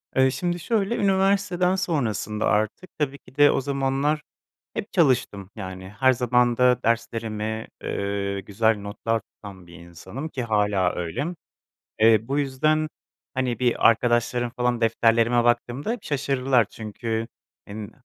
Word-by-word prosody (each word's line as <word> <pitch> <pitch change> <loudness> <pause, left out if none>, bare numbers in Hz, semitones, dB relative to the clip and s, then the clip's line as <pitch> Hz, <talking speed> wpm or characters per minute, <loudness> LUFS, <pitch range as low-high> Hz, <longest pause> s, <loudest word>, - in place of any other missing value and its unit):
Iıı, 130 0 +4
şimdi 175 +6 -2
şöyle 215 +4 0
üniversiteden 190 -2 +2
sonrasında 115 - -1
artık 110 - 0
tabii 140 -1 -1
ki 130 - -20
de 145 0 +7
o - - 0
zamanlar 140 +2 0 0.5
hep 210 - -5
çalıştım, 125 - +1
yani 95 -2 -7
her 130 0 +5
zaman 125 0 +2
da 125 -1 +3
derslerimi, 110 -1 -2 0.2
ııı, 100 0 -2
güzel 110 +3 +1
notlar 110 +2 -2
tutan 100 -3 -13
bir 85 - -14
insanım 90 - -8
ki 130 -5 -4
hâlâ 105 -5 +1
öyle. 90 - -3 0.7
Eee, 110 0 +5
bu 140 +2 0
yüzden 155 +3 +1 0.5
hani 130 -2 -1
bir 125 -2 +3
arkadaşlarım 120 +1 +1
falan 125 -1 0
defterlerime 115 +1 +3
baktığımda 120 - 0
şaşırdılar 135 - +1
çünkü 110 +1 -4 0.4
hen 105 +1 -7
120 Hz, 130 wpm, -24 LUFS, 110-140 Hz, 0.7 s, de